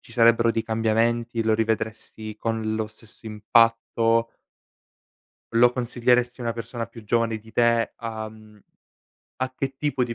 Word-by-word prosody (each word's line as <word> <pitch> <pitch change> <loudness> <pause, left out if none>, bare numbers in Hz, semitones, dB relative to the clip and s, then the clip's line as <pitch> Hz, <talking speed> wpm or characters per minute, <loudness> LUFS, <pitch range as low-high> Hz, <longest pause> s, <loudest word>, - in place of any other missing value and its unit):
ci 115 - -17
sarebbero 115 0 +5
dei 115 - -1
cambiamenti, 115 +1 0
lo 110 0 +2
rivedresti 110 -1 -3
con 110 -1 -2
lo 110 -1 -1
stesso 110 +1 -14
impatto 115 +1 +2 1.2
lo 120 +1 +6
consiglieresti 125 0 +1
a - - -4
una 115 - 0
persona 115 0 -5
più 115 - -13
giovane 115 +1 +1
di 110 +1 -16
te? 115 -2 +2
Uhm 110 -2 -7 0.8
a 130 - -1
che 135 -1 -3
tipo 145 -4 0
di 120 -1 -5
115 Hz, 140 wpm, -24 LUFS, 110-120 Hz, 1.2 s, lo